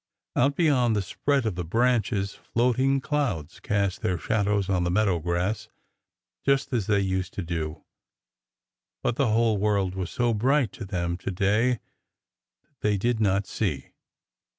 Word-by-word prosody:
Out 140 Hz, +3 st, +3 dB
beyond 130 Hz, -9 st, +3 dB
the 100 Hz, -, 0 dB
spread 140 Hz, +7 st, 0 dB
of 110 Hz, -, 0 dB
the 90 Hz, 0 st, -4 dB
branches, 110 Hz, 0 st, +1 dB
floating 130 Hz, +3 st, +1 dB
clouds 125 Hz, -, -2 dB
cast 100 Hz, -2 st, -1 dB
their 90 Hz, -, 0 dB
shadows 100 Hz, +2 st, 0 dB
on 90 Hz, -3 st, +1 dB
the 85 Hz, -, 0 dB
meadow 95 Hz, -1 st, +2 dB
grass 90 Hz, +6 st, -2 dB, 0.7 s
just 140 Hz, 0 st, +1 dB
as 115 Hz, -6 st, 0 dB
they 100 Hz, -2 st, +3 dB
used 95 Hz, -1 st, -2 dB
to 100 Hz, -, -3 dB
do, 80 Hz, -2 st, -4 dB, 1.2 s
but 120 Hz, -, +1 dB
the 135 Hz, +1 st, +2 dB
whole 110 Hz, -1 st, +2 dB
world 100 Hz, -3 st, +1 dB
was 95 Hz, -2 st, -3 dB
so 120 Hz, -1 st, +1 dB
bright 130 Hz, +3 st, +2 dB
to 130 Hz, -5 st, -8 dB
them 85 Hz, -2 st, -2 dB
to -, -, -5 dB
day 105 Hz, +6 st, +2 dB, 0.9 s
that 150 Hz, -2 st, -43 dB
they 105 Hz, -1 st, +2 dB
did 120 Hz, +3 st, 0 dB
not 100 Hz, -2 st, +2 dB
see. 90 Hz, -11 st, -3 dB
105 Hz, 155 wpm, -26 LUFS, 95-120 Hz, 1.2 s, Out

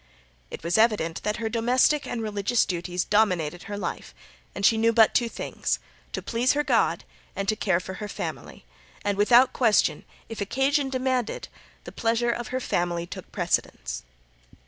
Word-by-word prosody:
It -, -, -8 dB
was 170 Hz, +5 st, +1 dB
evident 210 Hz, -8 st, +2 dB
that 210 Hz, 0 st, -1 dB
her 225 Hz, -, -2 dB
domestic 245 Hz, +6 st, +2 dB
and 230 Hz, -2 st, -3 dB
religious 210 Hz, +2 st, +1 dB
duties 180 Hz, 0 st, -2 dB
dominated 180 Hz, -6 st, +1 dB
her 205 Hz, -, -4 dB
life, -, -, -5 dB, 0.4 s
and 200 Hz, -, -1 dB
she 225 Hz, -, +6 dB
knew 225 Hz, +1 st, +3 dB
but 225 Hz, -1 st, +5 dB
two 240 Hz, -2 st, +2 dB
things -, -, -2 dB, 0.3 s
to -, -, -4 dB
please 240 Hz, +2 st, +1 dB
her 295 Hz, +1 st, +1 dB
God -, -, +1 dB, 0.3 s
and 195 Hz, 0 st, -3 dB
to 215 Hz, -, +2 dB
care 190 Hz, -5 st, +1 dB
for 190 Hz, +1 st, -7 dB
her 210 Hz, -, -3 dB
family, -, -, -6 dB, 0.4 s
and 205 Hz, -1 st, +1 dB
without 240 Hz, +5 st, +5 dB
question 225 Hz, -5 st, +2 dB, 0.2 s
if 225 Hz, -2 st, -7 dB
occasion 270 Hz, +6 st, +1 dB
demanded 255 Hz, -3 st, -1 dB, 0.3 s
the -, -, -9 dB
pleasure 230 Hz, +1 st, +1 dB
of 240 Hz, -1 st, -4 dB
her 255 Hz, +2 st, -2 dB
family 175 Hz, -7 st, -1 dB
took -, -, -9 dB
precedence. -, -, -2 dB
220 Hz, 170 wpm, -26 LUFS, 195-240 Hz, 0.4 s, she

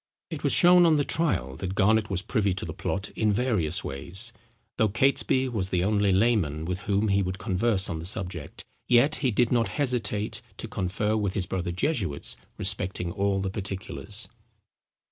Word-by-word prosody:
It -, -, -6 dB
was -, -, +2 dB
shown 175 Hz, 0 st, +7 dB
on 160 Hz, -, +4 dB
the 145 Hz, -, +2 dB
trial 70 Hz, -, 0 dB
that 95 Hz, 0 st, -4 dB
Garnet 110 Hz, +2 st, +3 dB
was 95 Hz, -2 st, -1 dB
privy 100 Hz, -6 st, 0 dB
to 95 Hz, -, -4 dB
the -, -, -5 dB
plot 100 Hz, +1 st, -3 dB
in 110 Hz, -1 st, +1 dB
various 100 Hz, -8 st, 0 dB
ways. 95 Hz, -, 0 dB, 0.4 s
Though 110 Hz, -, +3 dB
Catesby 130 Hz, +3 st, +2 dB
was 100 Hz, -6 st, -2 dB
the 90 Hz, -1 st, +1 dB
only 100 Hz, 0 st, +2 dB
layman 95 Hz, -7 st, +1 dB
with 90 Hz, +1 st, -3 dB
whom 100 Hz, +2 st, 0 dB
he 100 Hz, 0 st, +3 dB
would 95 Hz, 0 st, -3 dB
converse 95 Hz, 0 st, 0 dB
on 80 Hz, -, -4 dB
the 80 Hz, -, -6 dB
subject, 90 Hz, -5 st, -4 dB, 0.2 s
yet 125 Hz, +5 st, +4 dB
he 135 Hz, -, +1 dB
did 120 Hz, +1 st, +2 dB
not 115 Hz, -5 st, +2 dB
hesitate 115 Hz, -6 st, -1 dB, 0.2 s
to -, -, -6 dB
confer 100 Hz, +4 st, -1 dB
with 100 Hz, -3 st, -1 dB
his 95 Hz, -, 0 dB
brother 90 Hz, -2 st, -3 dB
jesuits 90 Hz, -, -1 dB, 0.2 s
respecting 90 Hz, -2 st, -1 dB
all 100 Hz, 0 st, 0 dB
the 95 Hz, -1 st, -2 dB
particulars. 100 Hz, +1 st, -4 dB
100 Hz, 180 wpm, -26 LUFS, 95-115 Hz, 0.4 s, shown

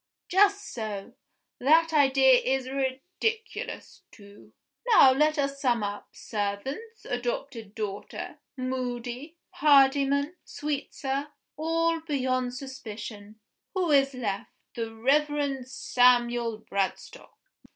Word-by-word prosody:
Just 400 Hz, +2 st, +3 dB
so! 215 Hz, -4 st, -5 dB, 0.5 s
That 320 Hz, +5 st, +4 dB
idea 265 Hz, -3 st, +5 dB
is 260 Hz, 0 st, -1 dB
ridiculous, 275 Hz, -, -3 dB
too. 200 Hz, -1 st, -16 dB, 0.4 s
Now 350 Hz, -, +8 dB
let 305 Hz, +3 st, +2 dB
us 275 Hz, -1 st, -1 dB
sum 240 Hz, -5 st, +2 dB
up. 205 Hz, 0 st, -4 dB
Servants, 240 Hz, -, -5 dB
adopted 245 Hz, -3 st, -4 dB
daughter, 205 Hz, -2 st, -5 dB, 0.2 s
Moody, 255 Hz, +3 st, -4 dB, 0.2 s
Hardyman, 280 Hz, +2 st, +4 dB
Sweetsir 280 Hz, -1 st, -3 dB, 0.3 s
all 330 Hz, +2 st, +1 dB
beyond 255 Hz, -5 st, -1 dB
suspicion. 220 Hz, -5 st, -8 dB, 0.3 s
Who 360 Hz, -4 st, +1 dB
is 275 Hz, -1 st, +4 dB
left? 205 Hz, -6 st, -3 dB, 0.2 s
The 230 Hz, -1 st, -4 dB
Reverend 275 Hz, +2 st, +1 dB
Samuel 240 Hz, -3 st, +2 dB
Bradstock." 195 Hz, -2 st, -4 dB
265 Hz, 95 wpm, -27 LUFS, 235-295 Hz, 0.5 s, Now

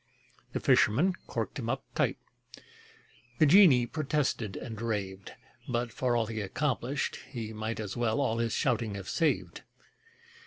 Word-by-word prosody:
The -, -, -1 dB
fisherman 160 Hz, -, +4 dB
corked -, -, -3 dB
him -, -, -3 dB
up -, -, -1 dB
tight: -, -, +1 dB, 1.2 s
The 155 Hz, -, +5 dB
genie 150 Hz, -7 st, +7 dB
protested 140 Hz, -, -1 dB
and 110 Hz, -3 st, -7 dB
raved, 100 Hz, -4 st, -3 dB, 0.4 s
But 120 Hz, -1 st, -1 dB
for 125 Hz, +1 st, 0 dB
all 115 Hz, -, +1 dB
he 110 Hz, 0 st, -4 dB
accomplished, 135 Hz, +5 st, -1 dB
he 115 Hz, -4 st, -5 dB
might 110 Hz, +1 st, -4 dB
As 105 Hz, -3 st, -4 dB
well 120 Hz, +1 st, 0 dB
all 115 Hz, -5 st, 0 dB
his 115 Hz, -1 st, 0 dB
shouting 110 Hz, -1 st, 0 dB
have 95 Hz, -2 st, -7 dB
saved. 165 Hz, -3 st, 0 dB
115 Hz, 145 wpm, -30 LUFS, 110-140 Hz, 1.2 s, genie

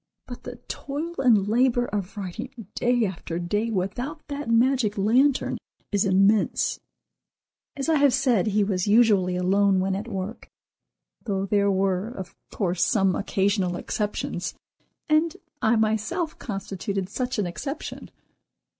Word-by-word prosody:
But 245 Hz, -, -9 dB
the 250 Hz, -, -6 dB
toil 300 Hz, +5 st, -4 dB
and 225 Hz, -7 st, +4 dB
labor 245 Hz, +2 st, +3 dB
of 205 Hz, -2 st, -4 dB
writing 215 Hz, +5 st, -6 dB
day 240 Hz, -1 st, +2 dB
after 175 Hz, -3 st, -4 dB
day 205 Hz, +6 st, -1 dB
without 230 Hz, -, -2 dB
that 285 Hz, -3 st, -4 dB
magic 230 Hz, -2 st, +3 dB
lantern 250 Hz, +8 st, +2 dB, 0.3 s
is 205 Hz, 0 st, +2 dB
immense!" 195 Hz, +2 st, +3 dB, 1.0 s
As 275 Hz, +1 st, -3 dB
I 320 Hz, -1 st, +3 dB
have 285 Hz, -1 st, +5 dB
said, 240 Hz, -7 st, +2 dB
he 210 Hz, 0 st, +2 dB
was 195 Hz, -1 st, -1 dB
usually 205 Hz, -5 st, +4 dB
alone 190 Hz, +2 st, +3 dB
when 190 Hz, +1 st, 0 dB
at 205 Hz, +4 st, -4 dB
work, 195 Hz, 0 st, -5 dB, 0.8 s
though 195 Hz, -3 st, -1 dB
there 200 Hz, 0 st, +2 dB
were, 190 Hz, 0 st, +1 dB
of 190 Hz, -7 st, -8 dB, 0.2 s
course, 180 Hz, -4 st, 0 dB
some 195 Hz, -5 st, +3 dB
occasional 195 Hz, -2 st, 0 dB
exceptions, 205 Hz, -3 st, -3 dB, 0.5 s
and 315 Hz, +3 st, +2 dB, 0.2 s
I 220 Hz, +2 st, +3 dB
myself 220 Hz, -, 0 dB
constituted 195 Hz, -2 st, -4 dB
such 250 Hz, +5 st, -3 dB
an 205 Hz, -, +1 dB
exception. 275 Hz, -, -6 dB
210 Hz, 135 wpm, -25 LUFS, 195-245 Hz, 1.0 s, have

